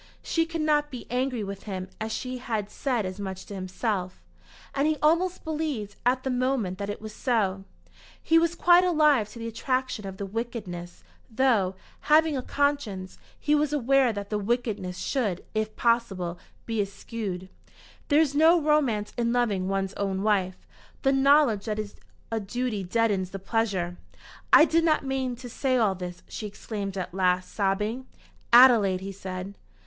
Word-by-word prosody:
She 330 -1 0
could 330 -1 -3
not 295 -1 +2
be 250 -4 -8
angry 250 -2 -1
with 195 0 -7
him 185 -3 -4
as 220 0 -3
she 255 +2 -4
had 220 -4 -3
said 245 -7 -1
as 185 +2 -5
much 190 -2 -5
to - - -9
himself. 185 0 -3 0.5
And 280 +2 +1
he 310 0 +1
almost 340 +4 +2
believed 300 -10 -3
at 255 +1 +2
the 265 - -1
moment 250 -7 0
that 200 0 -3
it 205 - -4
was 215 0 -8
so. 200 -6 0 0.5
He 330 0 +4
was 335 +1 +1
quite 350 +1 +6
alive 300 - +3
to - - -12
the 230 - -6
attraction 255 -2 -2
of 190 0 -7
the 200 - -4
wickedness, 195 -5 -6 0.3
though, 220 -6 +2 0.2
having 310 0 +4
a 260 - -1
conscience, 250 -10 -1 0.2
he 300 - +1
was 300 0 +2
aware 270 -2 +3
that 205 -1 -6
the 210 - 0
wickedness 205 -4 -2
should, 210 -10 -2
if 215 0 -2
possible, 195 -7 0 0.3
be 225 -2 0
eschewed. 195 -2 -5 0.6
There 290 0 +4
is 290 -3 +1
no 320 +4 +5
romance 285 -9 +1
in 235 0 +1
loving 215 -7 +1
one's 195 0 -1
own 195 -1 -1
wife. 190 -4 0 0.4
The 270 - +4
knowledge 270 -6 +4
that 215 -2 -2
it - - 0
is 205 - -13 0.4
a 225 - 0
duty 215 0 -3
deadens 195 -1 +1
the 195 - -6
pleasure. 195 -4 -1 0.5
"I 310 - +9
did 330 0 +2
not 310 -3 +2
mean 265 -2 -1
to 245 +1 -9
say 255 +2 0
all 215 -5 +3
this," 180 -1 -7
she 215 - -6
exclaimed 200 -1 -5
at 180 -2 -4
last, 185 -1 +1
sobbing. 210 +6 -1 0.4
"Adelaide!" 235 -7 +7
he 195 +1 -5
said. 190 0 -6
225 Hz, 175 wpm, -27 LUFS, 195-270 Hz, 0.6 s, I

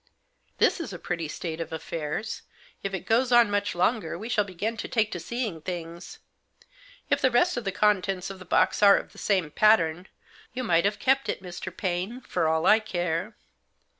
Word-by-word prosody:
"This - - +3
is 330 - -5
a 180 - -6
pretty 170 -2 -3
state 160 +1 -5
of 165 - -6
affairs. 160 +5 -4 0.4
If 195 - -3
it 185 - -6
goes 240 +3 +2
on 240 -3 +6
much 205 -1 0
longer 180 -2 0
we 220 +6 -7
shall 220 -3 +2
begin 200 +4 -4
to - - -4
take 220 -3 +1
to 175 - -4
seeing 220 -5 -4
things. 170 0 -7 0.9
If - - +3
the 260 - +4
rest 305 +9 +3
of 240 -3 -4
the 195 - 0
contents 195 -2 +1
of 195 - -10
the - - -9
box 180 - +2
are 200 -1 +8
of - - -6
the - - -14
same 185 -7 0
pattern, 180 -4 +3 0.5
you 255 - -2
might 170 -5 +2
have 205 0 +1
kept 270 +1 +1
it, - - -3
Mr. 180 0 -7
Paine, 190 +6 -2
for 165 - -1
all 160 0 +1
I 220 - +6
care." 180 -1 -3
195 Hz, 195 wpm, -26 LUFS, 170-220 Hz, 0.9 s, are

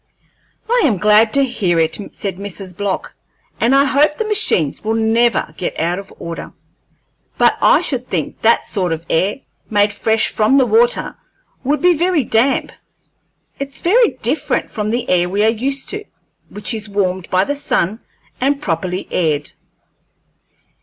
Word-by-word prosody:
"I 480 +1 +2
am 230 -9 +2
glad 215 +3 +4
to 275 -1 +4
hear 190 -9 0
it," 160 +3 +1
said 195 -3 -4
Mrs. 195 -2 -6
Block, 200 0 -3 0.5
"and 245 +4 +3
I 275 +1 +5
hope 290 +2 +2
the 445 - -2
machines 400 - +1
will 220 +1 0
never 225 +1 +1
get 180 - -3
out 175 +3 0
of 195 - -11
order. 170 0 -7 0.8
But - - +4
I - - +5
should 255 -6 -2
think 165 -5 -3
that 230 +1 +3
sort 185 -5 -1
of 165 +1 -6
air, 195 +10 +1 0.3
made 205 -1 +2
fresh 220 +2 +1
from 220 +5 +2
the 265 - +4
water, 475 - +1 0.5
would 295 +5 0
be 360 0 +6
very 345 -2 +1
damp. 240 +4 +1 0.9
It's 275 0 -6
very 455 +7 +3
different - - -1
from 210 -1 -3
the 240 +2 -2
air 175 -1 +2
we 200 +3 0
are 220 - +4
used 265 +5 -2
to, 420 +1 -4 0.5
which 210 +3 -4
is 215 -1 -4
warmed 190 -3 -1
by 185 0 +3
the 285 - -2
sun 220 -7 -1 0.4
and 275 +2 +1
properly 180 - -3
aired." 150 -4 0
220 Hz, 160 wpm, -17 LUFS, 185-275 Hz, 0.9 s, be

